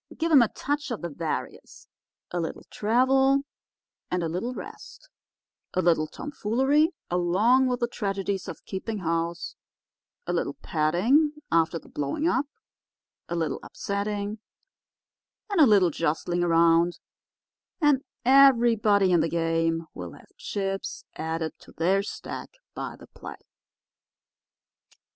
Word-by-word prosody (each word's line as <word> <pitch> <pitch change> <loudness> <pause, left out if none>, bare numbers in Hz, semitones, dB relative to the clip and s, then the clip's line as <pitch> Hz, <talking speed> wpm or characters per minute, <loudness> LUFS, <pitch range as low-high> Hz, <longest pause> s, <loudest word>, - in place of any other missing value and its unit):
Give 330 0 0
'em 285 -5 +8
a 235 - +4
touch 290 +6 -3
of 235 -7 -5
the 170 - -2
various—a 165 +2 -7
little 165 - -4
travel 265 +5 +3 0.7
and 180 -1 -1
a - - 0
little 230 +10 -3
rest, - - -10 0.7
a 185 - +3
little 165 -2 +3
tomfoolery 275 - +1 0.2
along 200 +10 +3
with 250 -1 -1
the 240 - +2
tragedies 195 -4 -3
of - - -8
keeping 210 +3 -4
house, 170 -1 -2 0.7
a 175 - -2
little 165 -5 -1
petting 210 - +2 0.2
after 165 0 +2
the - - -13
blowing 145 - -2
up, 290 -4 +1 0.8
a 170 - -2
little 165 -2 -1
upsetting 205 +1 -3 1.1
and 385 -5 +3
a 290 - +8
little 195 -5 +5
jostling 170 +3 -1
around—and 170 - 0 0.2
everybody 235 -7 +5
in 175 - +4
the 160 +1 +1
game 165 0 0
will 90 -2 -7
have - - -18
chips 195 -1 -4
added 160 0 -3
to - - -17
their 185 +5 +2
stack 205 - -7 0.2
by - - -5
the - - -14
play." - - -10
195 Hz, 125 wpm, -26 LUFS, 165-250 Hz, 1.1 s, em